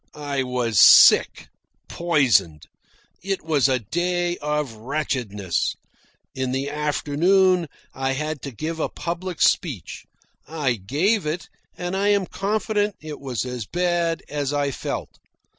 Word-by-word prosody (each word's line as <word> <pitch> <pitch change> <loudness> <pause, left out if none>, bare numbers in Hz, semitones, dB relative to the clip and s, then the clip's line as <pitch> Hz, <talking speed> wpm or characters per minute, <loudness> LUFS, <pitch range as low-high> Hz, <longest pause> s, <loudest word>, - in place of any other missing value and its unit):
I 145 -2 -3
was 125 -4 0
sick, - - +7 0.4
poisoned. 130 - +1 0.6
It 195 +1 -3
was 150 -4 +2
a 130 - +2
day 175 - -1
of 150 -4 -2
wretchedness. 110 - -2 0.6
In 130 -1 -2
the 135 +2 -2
afternoon 165 +5 +2 0.3
I 135 0 -1
had 150 +1 -4
to 140 - -6
give 160 +7 -5
a - - -1
public 175 0 -3
speech. 135 - 0 0.4
I 150 -6 -1
gave 150 - 0
it, 165 +3 -4 0.3
and 175 +1 -3
I 200 +1 +1
am 200 -2 +3
confident 210 +1 -1
it 155 -1 -8
was 130 -4 -3
as 125 -4 -5
bad 175 -2 0
as 145 -2 -3
I 145 -1 0
felt. - - -6
150 Hz, 130 wpm, -23 LUFS, 130-175 Hz, 0.6 s, sick